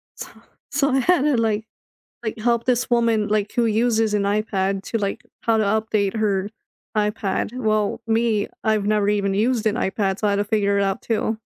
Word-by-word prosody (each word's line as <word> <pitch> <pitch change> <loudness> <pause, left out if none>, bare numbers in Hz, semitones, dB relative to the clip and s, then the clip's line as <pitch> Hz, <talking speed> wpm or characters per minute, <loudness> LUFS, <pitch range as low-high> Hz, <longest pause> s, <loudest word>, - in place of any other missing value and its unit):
So - - -7 0.4
so 280 0 +2
I 265 0 +2
had 350 +2 +3
to, 290 -4 +2
like 220 -1 0 0.6
like, 220 +1 -3
help 235 +1 +1
this 250 -1 +1
woman, 230 -3 +2
like, 210 -1 0
who 240 - +1
uses 225 -1 +2
an 205 - +2
iPad 200 -1 0
to, 230 - -2
like 200 -1 -3 0.2
how 225 -1 +2
to 215 - +2
update 215 -1 0
her 200 -2 0 0.5
iPad. 210 +1 -1
Well, 215 -3 0
me, 225 -2 +1 0.2
I've 215 -2 +1
never 210 -1 +2
even 200 -2 +1
used 225 +1 +1
an 210 - +2
iPad, 195 -3 -1
so 210 - +1
I - - +2
had 200 - +1
to 205 - 0
figure 200 -1 +1
it 200 - +2
out 195 0 -2
too. 220 -1 -1
215 Hz, 200 wpm, -22 LUFS, 205-230 Hz, 0.6 s, had